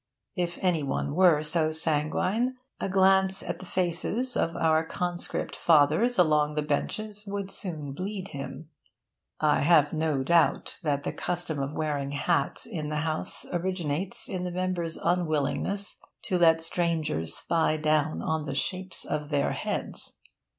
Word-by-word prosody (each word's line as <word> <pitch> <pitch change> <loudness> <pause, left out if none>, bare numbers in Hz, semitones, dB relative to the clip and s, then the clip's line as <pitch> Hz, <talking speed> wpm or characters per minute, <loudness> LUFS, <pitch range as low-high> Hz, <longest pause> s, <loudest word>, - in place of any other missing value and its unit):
If 175 -2 -2
any 175 -4 +2
one 140 0 -2
were 170 -3 +5
so 155 +1 +1
sanguine, 160 - +1 0.2
a - - -2
glance 190 0 +4
at - - -4
the 185 - -9
faces 190 +9 0
of 165 - 0
our 160 0 +2
Conscript 175 +1 -3
Fathers 165 +10 +3
along 150 -3 +3
the 150 - 0
benches 205 +8 -3
would 200 -1 -4
soon 155 -7 -2
bleed 190 +5 -5
him. 140 +3 -8 0.7
(I 150 -1 +3
have 150 -2 +4
no 155 -4 0
doubt 170 +3 +2
that 145 -3 -1
the - - -3
custom 175 -4 -2
of 135 +2 -3
wearing 145 -3 -2
hats 170 +4 0
in 160 -9 -5
the 150 0 -1
House 155 -1 -1
originated 175 -1 -1
in 185 -2 -3
the 180 - -2
members' 175 -2 -2
unwillingness 175 +3 -1 0.3
to 180 - 0
let 165 -1 +5
strangers 160 - 0
spy 160 -2 +1
down 155 0 +1
on 160 -1 -1
the 140 -2 -4
shapes 185 +4 -2
of 150 -1 -3
their 145 -2 +1
heads.) - - -2
165 Hz, 150 wpm, -27 LUFS, 150-185 Hz, 0.7 s, were